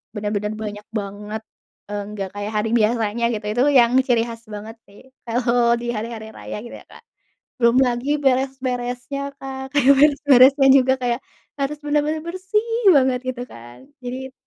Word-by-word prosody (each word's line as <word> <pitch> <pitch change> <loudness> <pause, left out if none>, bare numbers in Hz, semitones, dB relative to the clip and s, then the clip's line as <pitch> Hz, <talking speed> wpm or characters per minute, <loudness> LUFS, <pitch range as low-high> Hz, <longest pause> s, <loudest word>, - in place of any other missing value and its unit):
bener-bener 210 0 -2
banyak 210 0 -7
banget, 210 +2 -6 0.5
eee, 205 0 -3
nggak 195 -2 -5
kayak 205 +1 -4
hari 215 +1 0
biasanya 225 +1 0
gitu 210 0 -7
itu 245 +3 0 0.2
yang 235 0 +4 0.2
ciri 235 -2 +3
khas 230 0 -9
banget 215 +2 -8
sih 200 - -17 0.3
kalau 235 0 +2
di - - -6
hari-hari 220 0 -5
raya - - -7
gitu 240 - -9
ya - - -18
Kak. - - -15 0.6
Belum 235 +1 +4
lagi 245 +3 -2
beres-beresnya 255 0 -1 0.2
Kak 265 0 -7
kayak 280 -1 +5
beres-beresnya 275 -2 +5
juga 260 0 +3
kayak 240 0 0 0.4
harus 285 +2 -2
bener-bener 300 +1 0
bersih 380 +5 -1 0.3
banget 260 -2 +3
gitu 245 -1 -5
kan. 120 +1 -12 0.3
Jadi 260 +2 -6
245 Hz, 155 wpm, -21 LUFS, 215-265 Hz, 0.6 s, kayak